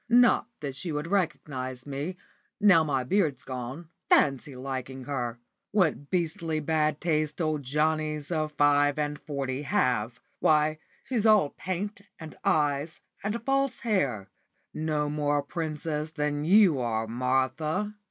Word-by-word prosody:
Not 240 -1 +5
that 140 -3 -4
she 165 +5 -4
would 150 0 -2
recognise 140 -9 -2
me, 145 +6 -4 0.4
now 195 -6 +6
my 135 -4 0
beard's 150 -3 +1
gone. 130 +5 -6 0.2
Fancy 135 -1 +3
liking 130 0 -5
her! 125 -4 -3 0.3
What 170 -8 +1
beastly 165 -2 -1
bad 155 -1 +1
taste 155 -2 0
old 155 -3 0
Johnnies 150 +2 -1
of 155 -2 0
five 145 0 +3
and 150 -1 -2
forty 135 -2 -3
have! 125 - 0 0.2
Why, 155 0 +3 0.2
she's 230 -4 0
all 210 -9 +5
paint, 195 +3 -4 0.2
and 160 -1 -9
eyes, 150 +1 +1 0.2
and 225 +4 -3
false 275 -2 +1
hair 140 - 0 0.4
no 155 -1 -1
more 145 0 0
a 145 - 0
princess 155 0 -3
than 150 -1 -2
you 185 -5 +6
are, 115 -2 -1
Martha." 130 - 0
150 Hz, 135 wpm, -28 LUFS, 140-170 Hz, 0.4 s, now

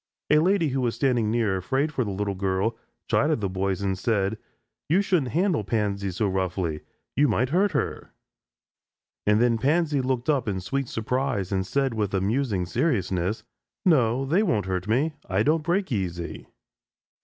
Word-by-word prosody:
A 150 - +6
lady 175 -1 +2
who 135 0 -1
was 120 -2 0
standing 120 -6 +1
near, 110 -4 +1
afraid 135 - -1
for 130 - 0
the 105 - -4
little 100 +1 -2
girl, 95 +3 0 0.3
chided 150 -1 +2
the 100 - -1
boys 95 +1 -2
and 95 -1 0
said: 105 0 0 0.5
"You 185 +6 +4
shouldn't 160 - 0
handle 175 - +2
Pansy 100 -2 -1
so 100 +4 -1
roughly 95 -4 -1 0.3
you 145 +1 +4
might 125 +2 +1
hurt 190 +6 +2
her." - - -2 1.2
And 105 +1 +4
then 115 -1 +3
Pansy 150 +2 +2
looked 130 -1 -1
up 140 -6 +1
in 95 -2 -1
sweet 135 +9 -2
surprise 115 -4 -2
and 95 -1 -1
said 135 0 0
with 105 -3 -1
amusing 100 0 0
seriousness: 95 - 0 0.4
"No; 130 -6 +3
they 165 +9 +2
won't 110 - +1
hurt 95 0 -2
me. 135 +9 +1 0.2
I 95 +3 +2
don't 155 +4 +2
break 180 +3 0
easy." 90 -6 -3
115 Hz, 165 wpm, -25 LUFS, 95-140 Hz, 1.2 s, A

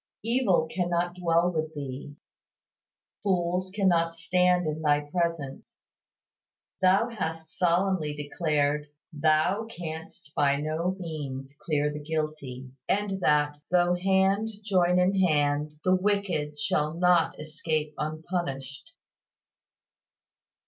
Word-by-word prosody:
Evil 230 -7 +2
cannot 175 0 -1
dwell 175 0 +2
with 155 -1 -2
Thee, 140 0 -6 1.1
fools 180 -1 0
cannot 175 -4 +2
stand 180 +1 +2
in 155 0 -2
Thy 145 -1 +3
presence. 155 -3 -3 1.1
Thou 190 +6 +4
hast 160 -7 -5
solemnly 175 -3 +1
declared, 150 0 0 0.3
"Thou 155 +7 +2
canst 160 -7 -8
by 140 -1 +3
no 155 +5 -1
means 140 -5 -5
clear 150 -2 0
the 150 - -5
guilty," 150 -5 -4 0.2
and 200 -1 0
that 150 -2 +2
"though 175 0 +3
hand 190 +3 +2
join 180 -3 +3
in 185 +2 +3
hand, 150 -3 +2
the 185 - +3
wicked 185 -6 0
shall 150 +1 0
not 175 -1 +3
escape 155 0 -2
unpunished." 155 - -4
165 Hz, 105 wpm, -27 LUFS, 150-180 Hz, 1.1 s, Thou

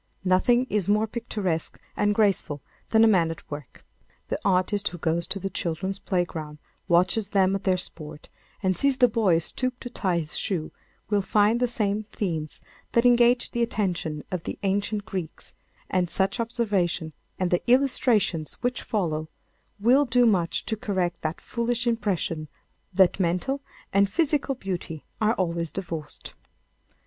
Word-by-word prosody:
Nothing 240 +7 +4
is 205 -6 -1
more 210 +2 +3
picturesque 210 -7 -3 0.2
and 205 0 +2
graceful 195 -8 +1 0.3
than 220 0 +5
a - - +7
man 180 -6 +4
at 165 - -8
work. 145 -2 -8 0.4
The - - -1
artist 195 +2 +2
who 175 - -8
goes 165 +1 -1
to 195 - -2
the 195 +1 -4
children's 180 +3 -3
playground, 165 -5 -2 0.3
watches 185 +4 +2
them 190 -2 +3
at 195 - -5
their 185 -1 +3
sport 155 -4 -6 0.4
and 185 -1 +2
sees 275 +7 +1
the 250 - +6
boy 215 -7 +3
stoop 250 +9 -2
to 245 - -7
tie 185 -7 0
his 155 -2 -3
shoe, 170 -6 -2 0.4
will 205 -1 +3
find 210 +4 +3
the 245 - +2
same 210 -3 0
themes 165 -8 -4 0.3
that 235 +1 +3
engaged 240 0 +4
the 235 - 0
attention 180 -9 -1
of 180 -2 -2
the - - -5
ancient 200 +1 0
Greeks, 185 -4 -6 0.3
and 180 -2 0
such 195 +6 0
observation 200 -9 0 0.2
and 185 -1 0
the 175 - +2
illustrations 240 - +2
which 250 0 -1
follow 160 -8 -2 0.5
will 255 +7 +5
do 245 0 +4
much 185 -7 +1
to 220 - -1
correct 190 -5 -2
that 155 +1 -3
foolish 240 +1 -2
impression 195 -9 -1 0.4
that 190 0 +4
mental 180 +10 0 0.3
and 200 0 +4
physical 290 - +1
beauty 180 - -5 0.2
are 220 +2 +3
always 170 -3 -1
divorced. 165 -5 -6
195 Hz, 155 wpm, -26 LUFS, 170-225 Hz, 0.5 s, a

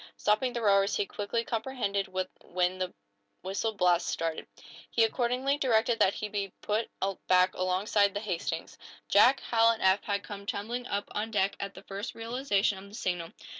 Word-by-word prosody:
Stopping 215 +5 +2
the 235 - -3
rowers, 200 -1 +4
he 205 - +1
quickly 205 +4 -2
comprehended 225 -5 -2
when 185 -1 -2
the 185 -1 -2 0.5
whistle 200 +4 -1
blasts 180 -3 +2
started. 165 -1 -2 0.4
He 230 - +3
accordingly 250 +5 +1
directed 230 -3 +2
that 190 - +4
he 215 - -3
be 200 -2 -3
put 215 +2 -1 0.4
back 185 0 +5
alongside 200 +2 +1
the - - 0
"Hastings." 175 -5 -4 0.3
Jack, 255 +7 +6
Hal 230 -1 +4
and 230 -1 0
Eph 190 +1 +4
had 200 -1 -1
come 200 -1 -8
tumbling 240 +5 -3
up 200 0 -2
on 215 +2 -2
deck 200 -2 +1
at 200 -1 -5
the 190 - -11
first 200 +3 -6
realization 225 -4 0
of 200 +1 -12
the 205 - -11
signal. 175 -6 -2
205 Hz, 170 wpm, -29 LUFS, 190-225 Hz, 0.5 s, Jack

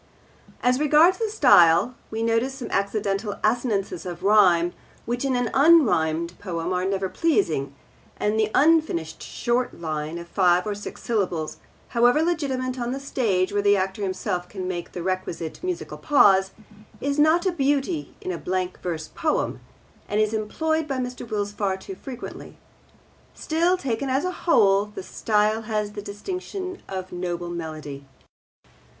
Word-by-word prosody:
As 250 +1 +3
regards 310 +5 +5
the 450 -1 0
style, 175 - +5 0.2
we 220 +1 -3
notice 230 +4 +1
some 255 -3 -7
accidental 200 +1 -1
assonances 215 -5 0
of 175 -2 -7
rhyme 180 -4 +4 0.3
which 240 +2 -2
in 270 -2 +1
an 245 -2 0
unrhymed 180 - +3
poem 175 -2 -3
are 180 0 0
never 195 0 0
pleasing; 240 - 0 0.4
and 210 +1 0
the 215 -1 +2
unfinished 290 - +2
short 240 -3 -2
line 155 0 -3
of 170 0 -8
five 180 -1 +3
or 210 - -1
six 205 0 -8
syllables, 180 -9 -1 0.3
however 245 +6 +4
legitimate 265 -6 -1
on 240 +1 -2
the 270 - -4
stage 205 -9 0
where 205 - +2
the 205 0 +4
actor 190 +2 -2
himself 180 -2 -2
can 185 -2 -5
make 175 -2 -5
the 175 - -5
requisite 185 -3 -3
musical 360 -1 -4
pause, 195 -9 +5 0.5
is 280 +1 -1
not 315 +4 +4
a 375 - +3
beauty 290 +1 -1
in 185 - -3
a 170 - -4
blank 185 0 -3
verse 160 -3 -4
poem, 310 -1 -1 0.5
and 205 - 0
is 215 0 +2
employed 315 +9 -1
by 270 -3 -2
Mr. 250 -2 -5
Wills 205 -2 -2
far 200 -2 -1
too 385 - -8
frequently. 265 -9 -9 0.8
Still, 340 +3 +1
taken 270 -3 -2
as 270 +5 +1
a 365 - 0
whole, 205 - +3
the 210 -2 -8
style 215 +2 +1
has 215 -2 -2
the 205 - -6
distinction 370 - -6
of 185 -1 -5
noble 175 -1 -4
melody. 155 -4 -6
210 Hz, 155 wpm, -24 LUFS, 185-270 Hz, 0.8 s, regards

